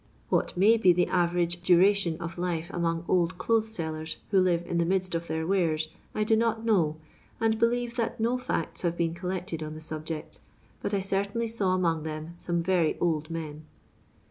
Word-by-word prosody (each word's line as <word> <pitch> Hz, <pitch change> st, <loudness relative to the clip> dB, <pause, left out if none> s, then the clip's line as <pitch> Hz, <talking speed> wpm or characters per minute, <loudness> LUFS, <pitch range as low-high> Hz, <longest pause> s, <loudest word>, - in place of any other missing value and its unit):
What -, -, 0 dB
may 215 Hz, +5 st, +6 dB
be 185 Hz, -5 st, +5 dB
the 175 Hz, +1 st, +3 dB
average 175 Hz, -1 st, 0 dB
duration 180 Hz, -1 st, +4 dB
of 170 Hz, 0 st, -6 dB
life 175 Hz, 0 st, -2 dB
among 165 Hz, -1 st, -1 dB
old 175 Hz, -1 st, +2 dB
clothes 220 Hz, +2 st, +1 dB
sellers 160 Hz, -2 st, -4 dB
who 195 Hz, -, +5 dB
live 175 Hz, -2 st, +2 dB
in 170 Hz, 0 st, -1 dB
the -, -, +3 dB
midst 185 Hz, 0 st, 0 dB
of 170 Hz, 0 st, -2 dB
their 160 Hz, 0 st, -2 dB
wares, 160 Hz, -4 st, +1 dB, 0.3 s
I 215 Hz, -, +1 dB
do 220 Hz, +1 st, +3 dB
not 225 Hz, 0 st, 0 dB
know, 170 Hz, -9 st, +2 dB, 0.4 s
and 220 Hz, -1 st, +1 dB
believe 240 Hz, +1 st, +1 dB
that 235 Hz, +1 st, -1 dB
no 235 Hz, +3 st, +1 dB
facts 250 Hz, -10 st, -2 dB
have 170 Hz, -1 st, -1 dB
been 165 Hz, -1 st, 0 dB
col 180 Hz, +1 st, -5 dB
lected 180 Hz, -3 st, -3 dB
on 155 Hz, 0 st, -5 dB
the -, -, -7 dB
subject; 155 Hz, 0 st, -6 dB, 0.4 s
but 205 Hz, -, -1 dB
I 195 Hz, -, 0 dB
certainly 200 Hz, +4 st, -1 dB
saw 200 Hz, -5 st, +1 dB
among 165 Hz, -3 st, +1 dB
them 155 Hz, +1 st, -5 dB
some 170 Hz, -1 st, -1 dB
very 175 Hz, -3 st, +2 dB
old 155 Hz, -3 st, 0 dB
men. 155 Hz, -2 st, -6 dB
175 Hz, 195 wpm, -28 LUFS, 165-200 Hz, 0.4 s, may